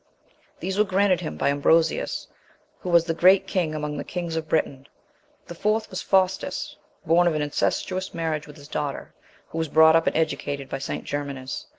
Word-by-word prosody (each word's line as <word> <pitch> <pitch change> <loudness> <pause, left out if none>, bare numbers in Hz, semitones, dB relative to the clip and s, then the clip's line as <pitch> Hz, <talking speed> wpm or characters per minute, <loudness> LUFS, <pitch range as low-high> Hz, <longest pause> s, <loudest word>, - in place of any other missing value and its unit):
These 190 +3 -2
were - - +6
granted 195 -2 +2
him 75 - -5
by - - +1
Ambrosius, 160 +3 +1 0.5
who 180 - -5
was 170 -1 +5
the 165 - -1
great 185 +3 +5
king 175 -5 -1
among 150 -1 -3
the - - -3
kings 170 -2 -4
of 160 -1 -4
Britain. 140 -3 -1 0.6
The - - -8
fourth 215 +4 -1
was 185 - -4
Faustus, 190 0 0 0.3
born 170 +2 +4
of 165 - +1
an 150 - 0
incestuous 185 +5 -1
marriage 160 -3 -3
with 150 - -12
his 145 -2 -13
daughter, 145 -2 -4 0.4
who 165 - -4
was 160 - 0
brought 160 +2 +6
up 165 - +3
and - - +1
educated 145 -4 -2
by 135 - -4
St. 135 - -4
Germanus. 140 -2 -5
160 Hz, 190 wpm, -24 LUFS, 145-180 Hz, 0.6 s, were